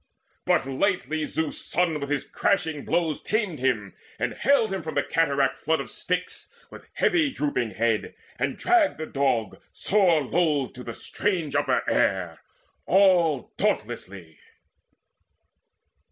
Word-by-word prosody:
But - - +2
lightly 155 +1 -1
Zeus' 160 -1 -3
son 165 -2 0
with 140 -1 -5
his 145 -1 -1
crashing 160 -7 0
blows 165 -3 0
Tamed 210 - -1
him, 115 -7 0 0.2
and - - -2
haled 260 -7 +2
him 190 - -2
from 160 0 -6
the - - +2
cataract 140 -5 +1
flood 160 +1 +1
Of - - -6
Styx, 180 0 -3 0.2
with - - -13
heavy 325 -5 +2
drooping 125 - -2
head, 115 +1 0 0.2
and - - -1
dragged 355 -5 +3
The 155 - -4
Dog 135 -7 -1
sore 180 -7 +2
loth 150 -2 0
to 125 - -9
the 115 - -7
strange 175 -8 -2
upper - - +1
air 90 -4 +1 0.5
All 175 -7 +3
dauntlessly. 90 -5 -3
155 Hz, 135 wpm, -25 LUFS, 130-180 Hz, 0.5 s, dragged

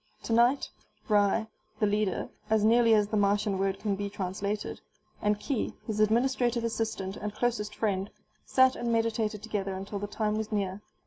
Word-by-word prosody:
Tonight 240 +4 +3 0.4
Ry, 205 +1 +3 0.3
the 215 - +3
leader 205 -2 0 0.2
(as 220 -1 +3
nearly 230 0 +5
as 210 -1 +2
the 215 - 0
Martian 200 -1 +2
word 195 0 0
can 205 -2 -1
be 200 +1 -3
translated), 200 +2 -3 0.4
and 210 0 +1
Khee, 260 -2 -2
his 215 -2 -3
administrative 240 +2 +2
assistant 220 -4 -2
and 210 0 -5
closest 215 -3 -1
friend, 200 -2 -1 0.3
sat 260 0 +4
and 240 0 -2
meditated 225 -2 0
together 200 -3 -2
until 195 +2 -5
the 205 - -3
time 210 0 -1
was 220 0 -3
near. 200 -1 -1
210 Hz, 165 wpm, -29 LUFS, 200-225 Hz, 0.4 s, nearly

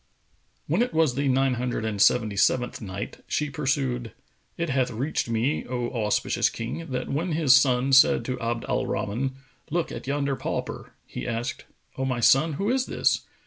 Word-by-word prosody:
When 170 +9 +1
it 245 -8 -1
was 160 -5 +3
the 140 +2 -1
Nine 135 0 +2
Hundred 120 -2 -2
and 105 -3 -2
Seventy 110 -4 +3
seventh 125 +5 +1
Night, 95 -4 -6
She 150 -1 -1
pursued, 130 -5 -1 0.4
It 170 -3 -1
hath 130 -1 +1
reached 125 +2 -2
me, 115 +6 0
O 120 -1 -3
auspicious 105 -3 +1
King, 165 +9 -5
that 130 -1 -3
when 165 +4 -1
his 150 -5 +5
son 135 -1 +3
said 135 - +6
to 130 -1 -3
Abd 115 0 -2
al - - 0
Rahman, 130 +6 -2 0.3
"Look 170 +1 -1
at - - -7
yonder 140 0 0
pauper!" - - -5
he - - -6
asked, 115 0 -3 0.3
"O 135 - 0
my 130 -2 -1
son, 135 +7 +4
who 195 +10 -1
is 260 0 0
this?" - - 0
130 Hz, 180 wpm, -26 LUFS, 120-145 Hz, 0.4 s, said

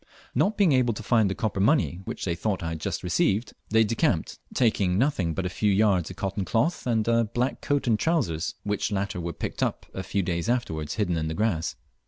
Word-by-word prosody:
Not 210 +2 +1
being 200 -6 +4
able 125 -4 +3
to 115 - -6
find 110 -2 +3
the 95 - -2
copper 105 -3 -2
money 105 - +2
which - - -5
they 85 - 0
thought 95 +1 -2
I 80 - -2
had 80 -1 -4
just - - -3
received, 100 +5 +1 0.2
they 110 +1 +5
decamped, 110 +1 0
taking 100 -6 +2
nothing 100 - +1
but 95 - -2
a - - +1
few 105 +3 +1
yards 95 -4 +3
of - - -8
cotton 100 0 -2
cloth 125 - 0
and 115 -2 +1
a 115 0 +3
black 120 +4 -2
coat 145 -1 0
and 110 -4 +2
trousers, 100 - 0
which 105 +1 -1
latter 100 -3 -2
were 85 0 -3
picked - - -5
up - - -1
a 95 - -4
few 100 +1 -1
days 85 +2 -2
afterwards 80 -12 -1
hidden 95 -6 0
in 80 0 -1
the 80 - -3
grass. 90 -7 0
105 Hz, 225 wpm, -26 LUFS, 90-115 Hz, 0.2 s, they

